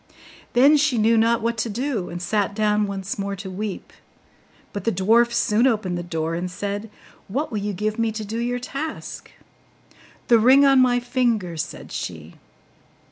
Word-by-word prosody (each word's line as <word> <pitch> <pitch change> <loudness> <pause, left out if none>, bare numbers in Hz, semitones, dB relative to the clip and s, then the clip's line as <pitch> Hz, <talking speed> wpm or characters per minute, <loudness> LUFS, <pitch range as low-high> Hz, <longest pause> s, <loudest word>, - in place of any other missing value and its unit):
Then 275 +5 +6
she 290 -4 +2
knew 225 +1 +4
not 230 0 +2
what 230 0 -1
to 225 +1 -1
do, 235 -3 -2
and 175 - -6
sat 200 +2 -1
down 210 -1 +1
once 195 0 -5
more 200 0 -2
to 195 0 -7
weep; 200 +1 -5 0.8
but 205 - -4
the 230 - +1
dwarf 225 +6 +3
soon 235 +1 +2
opened 210 -7 0
the 175 - -3
door, 165 -1 -3
and 175 +2 -3
said, 205 +4 -4 0.4
'What 275 +10 -2
will 215 - -2
you 205 +1 -2
give 215 +4 -2
me 230 -1 +1
to 215 0 -5
do 225 +3 -4
your 245 +1 -1
task?' 275 +5 -6 1.0
'The 235 -2 +6
ring 260 +5 +6
on 270 -1 +5
my 245 -1 +3
finger,' 240 -8 0
said 155 - -6
she. 80 -2 -6
215 Hz, 180 wpm, -23 LUFS, 195-240 Hz, 1.0 s, Then